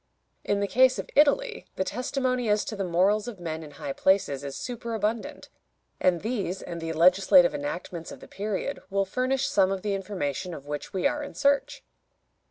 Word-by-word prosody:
In 200 0 0
the 200 - +1
case 255 +3 +4
of - - -6
Italy 450 - +3
the - - 0
testimony 255 +1 -1
as 210 0 +2
to 215 - -4
the 200 - -2
morals 195 +5 +2
of 225 -6 -7
men 160 -2 -4
in 155 - -9
high 140 -1 -6
places 165 -8 +2
is 140 -1 -5
superabundant, 230 -2 -3 0.5
and 180 -3 +2
these 200 -5 -3
and 170 -1 -6
the 165 0 -3
legislative 180 +2 +5
enactments 165 +3 -5
of - - -10
the - - -13
period 210 +7 -3
will 195 0 +1
furnish 255 +6 0
some 195 -1 +3
of 195 -1 -3
the 205 -1 0
information 185 -3 -3
of 140 - -10
which 145 0 -5
we 190 -3 -2
are 295 - +1
in 290 - -7
search. 280 0 +1
195 Hz, 185 wpm, -27 LUFS, 175-240 Hz, 0.5 s, legislative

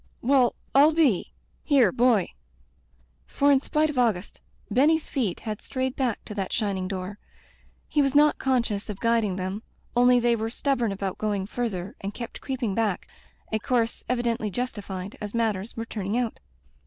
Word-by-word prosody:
"Well, 255 -1 +4 0.2
rU 290 +4 +6
be— 280 - +2 0.3
Here, 265 -10 +4
boy." 235 -3 +3 1.0
For 285 +1 +3
in 275 - +5
spite 305 +2 +1
of 265 - -2
Auguste, 210 -6 0 0.3
Benny's 300 +7 +3
feet 230 - -1
had 215 -2 -5
strayed 260 -1 -2
back 250 -5 -1
to - - -7
that 195 -3 -3
shining 195 -3 -1
door. 190 +1 -5 0.7
He 295 - +2
was 275 0 +1
not 300 +1 +5
conscious 235 -6 0
of 200 -2 -5
guiding 230 -4 +2
them, 190 +3 -3 0.3
only 245 0 +5
they 240 0 +3
were 225 0 -2
stubborn 245 -2 0
about 195 -1 -4
going 205 -3 -1
further, 200 -5 -3
and 200 +1 -5
kept 235 -1 -7
creeping 255 -6 -2
back 210 -3 -1 0.2
— - - -34
z 220 - +2
course 235 0 0
evidendy 235 -3 0
justified, 205 -5 -5
as 210 +1 -5
matters 220 -2 -1
were 225 - -3
turning 210 0 -3
out. 240 -3 -2
230 Hz, 165 wpm, -26 LUFS, 205-255 Hz, 1.0 s, rU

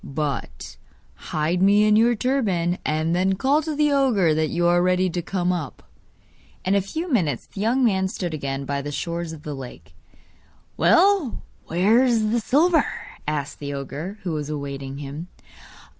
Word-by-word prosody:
'But 140 - -4 0.5
hide 160 +4 0
me 200 +2 +5
in 210 0 +4
your 235 +2 +4
turban, 200 -9 0
and 155 +2 0
then 190 +2 +2
call 270 +10 +2
to 310 -1 -4
the 300 0 +2
ogre 240 - +3
that 155 0 0
you 175 0 0
are 175 0 +4
ready 185 0 +2
to 175 - -2
come 180 +1 -1
up.' 160 -6 -5 0.8
In 190 - +2
a 200 - +3
few 320 - -4
minutes 155 - 0
the 195 - -8
young 245 +5 +2
man 190 -4 +2
stood 175 -3 -4
again 140 -2 -3
by 140 0 -2
the 145 +1 -5
shores 170 +2 -3
of 155 -2 -10
the 150 - -5
lake. 105 - -10 0.8
'Well, 370 - +3 0.2
where 205 +9 +3
is 225 -4 +2
the 235 - +2
silver?' 310 +7 +3 0.4
asked 150 -1 -3
the 145 -1 -5
ogre, 145 +8 -6
who 180 - -2
was 150 -2 -3
awaiting 140 -2 -5
him. 145 +4 -7
175 Hz, 175 wpm, -23 LUFS, 150-220 Hz, 0.8 s, me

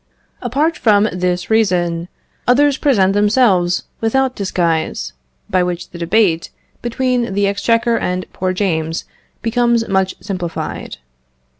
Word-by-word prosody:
Apart 285 +7 0
from 210 -2 +4
this 180 +1 -2
reason, 175 -6 +1 0.4
others 280 +3 +4
present 200 -11 +2
themselves 205 -4 +3 0.2
without 260 +3 +1
disguise, 170 - -1 0.3
by 185 -3 +2
which 180 0 -3
the 170 - -9
debate 170 -1 +2 0.3
between 240 -3 -1
the 200 0 +2
exchequer 230 +4 +1
and 180 0 -2
poor 185 0 -1
James 165 -4 -1 0.4
becomes 235 0 +2
much 190 -1 +1
simplified. 180 -5 -5
200 Hz, 115 wpm, -17 LUFS, 180-235 Hz, 0.4 s, from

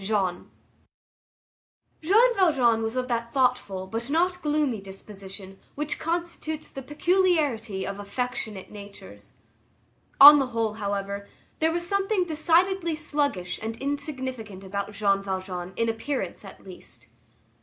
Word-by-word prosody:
Jean 190 -3 -1 1.5
Valjean 335 - +4
was 225 +2 -2
of 255 0 -1
that 235 -1 -2
thoughtful 250 -8 0
but 225 +6 -5
not 360 +4 +1
gloomy 295 - 0
disposition 195 0 -10 0.2
which 295 +1 -2
constitutes 330 -2 -3
the 270 - -7
peculiarity 295 - +1
of 200 +1 -5
affectionate 215 -2 -4
natures. 200 - -11 0.9
On 290 +1 +12
the 270 - 0
whole, 225 -3 -1
however, 200 -1 -4 0.3
there 320 +1 +3
was 345 +1 -2
something 395 0 +1
decidedly 340 +2 +2
sluggish 285 - -1
and 225 +1 -4
insignificant 260 -8 -4
about 200 +1 -4
Jean 200 -1 +2
Valjean 185 -2 -4
in 230 - 0
appearance, 230 +5 -3
at - - -12
least. - - -13
245 Hz, 120 wpm, -26 LUFS, 200-310 Hz, 1.5 s, On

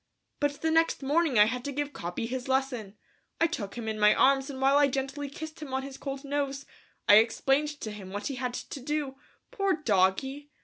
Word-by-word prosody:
But 290 -1 -1
the 320 - +2
next 325 -3 +2
morning 295 -1 +2
I 210 - +8
had 250 +2 -2
to 285 - -2
give 290 +1 -3
Capi 175 +6 -4
his 250 +2 -4
lesson, 255 -6 -1 0.4
I - - +4
took 235 -12 -3
him 235 -2 -5
in 220 -1 -3
my 210 0 +6
arms 270 0 +3
and 265 -2 -6
while 270 +1 +4
I 290 0 +6
gently 275 +1 -3
kissed 315 +3 -8
him 270 -3 -4
on 265 - -1
his 275 0 -8
cold 275 0 -5
nose, 280 -1 -2 0.4
I 205 - +9
explained 270 +6 +2
to 215 - -4
him 200 -3 -9
what 205 +2 -5
he 280 - -2
had 250 -1 -3
to 275 - -6
do; 280 0 -3 0.3
poor 395 -1 +1
doggy! 265 - +1
270 Hz, 215 wpm, -28 LUFS, 235-290 Hz, 0.4 s, I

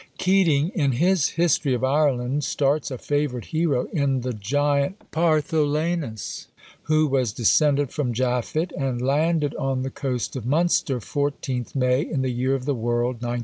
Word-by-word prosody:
Keating, 175 -5 +3
in 140 -7 +1
his 175 +4 +2
"History 160 -5 +1
of 125 - -4
Ireland," 135 -1 +1
starts 140 +2 0
a 130 - -5
favourite 145 -3 -2
hero 155 -6 0
in 140 -5 +1
the 125 0 -3
giant 140 - -1
Partholanus, 155 - 0 0.4
who 155 0 +3
was 130 -6 +1
descended 140 +5 +2
from 135 -5 -1
Japhet, 125 +7 -1
and 135 -3 -2
landed 150 +3 +1
on 135 -1 -1
the 135 - -4
coast 130 -3 -3
of 130 - -4
Munster 145 0 +1
14th 135 -1 -3
May, 125 0 +2
in 150 -4 -2
the 130 - 0
year 130 +2 0
of 130 -1 -5
the 145 - +1
world 120 +1 -1
1987. 120 +1 -3
140 Hz, 155 wpm, -23 LUFS, 125-155 Hz, 0.4 s, Keating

